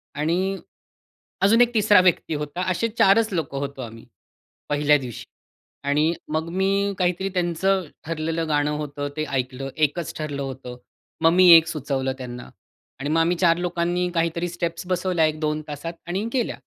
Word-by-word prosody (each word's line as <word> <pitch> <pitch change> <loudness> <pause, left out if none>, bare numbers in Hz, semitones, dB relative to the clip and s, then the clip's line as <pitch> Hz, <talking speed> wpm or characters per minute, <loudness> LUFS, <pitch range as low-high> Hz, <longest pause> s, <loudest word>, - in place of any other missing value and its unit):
आणि 180 +6 0 0.9
अजून 225 +4 +5
एक 240 0 +5
तिसरा 210 -3 +5
व्यक्ती 180 -3 +2
होता. 150 +4 -4
असे 230 +6 0
4च 210 +2 +4
लोकं 145 -5 -2
होतो 140 -1 -5
आम्ही 115 -1 -9 0.7
पहिल्या 150 0 +4
दिवशी. 125 -5 -7 0.6
आणि 150 +4 +2 0.2
मग 160 +1 -1
मी 195 +2 +1
काहीतरी 180 +2 0
त्यांचं 180 +2 +1 0.2
ठरलेलं 165 0 -2
गाणं 145 0 +1
होतं, 145 -1 -4
ते 155 - 0
ऐकलं. 130 0 -3
एकच 155 +2 0
ठरलं 145 -2 -4
होतं. 130 -2 -6 0.4
मग 165 - +5
मी 185 0 +6
एक 165 0 +2
सुचवलं 135 -4 -2
त्यांना 120 -1 -8 0.5
आणि 145 +2 -3
मग 160 - +2
आम्ही 175 +2 +2
4 170 -2 +3
लोकांनी 175 0 -1
काहीतरी 170 +1 0
स्टेप्स 170 0 -4
बसवल्या 180 -2 +1
1-2 155 0 -1
तासात 150 +3 -6
आणि 195 +6 -2
केल्या. 250 - -1
165 Hz, 155 wpm, -23 LUFS, 145-180 Hz, 0.9 s, मी